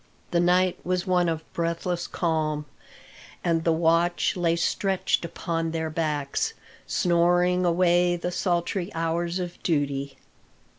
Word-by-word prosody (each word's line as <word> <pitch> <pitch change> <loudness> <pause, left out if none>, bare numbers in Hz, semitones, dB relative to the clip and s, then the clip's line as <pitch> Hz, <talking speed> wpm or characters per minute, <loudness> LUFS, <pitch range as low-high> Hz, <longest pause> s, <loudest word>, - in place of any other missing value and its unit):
The 170 - +2
night 180 +1 +3
was 180 0 -1
one 180 -2 +2
of 160 -1 -3
breathless 170 +1 -2
calm, 155 -3 -1 0.8
and 165 -2 +1
the 165 - +3
watch 165 +2 +2
lay 170 -2 +1
stretched 190 +3 0
upon 165 0 -3
their 160 -1 -3
backs, 150 -3 -1 0.3
snoring 175 +1 +2
away 175 0 +3
the 175 +1 -3
sultry 175 +1 -1
hours 170 +2 -1
of 180 -1 -5
duty. 140 -4 -1
170 Hz, 120 wpm, -26 LUFS, 165-175 Hz, 0.8 s, night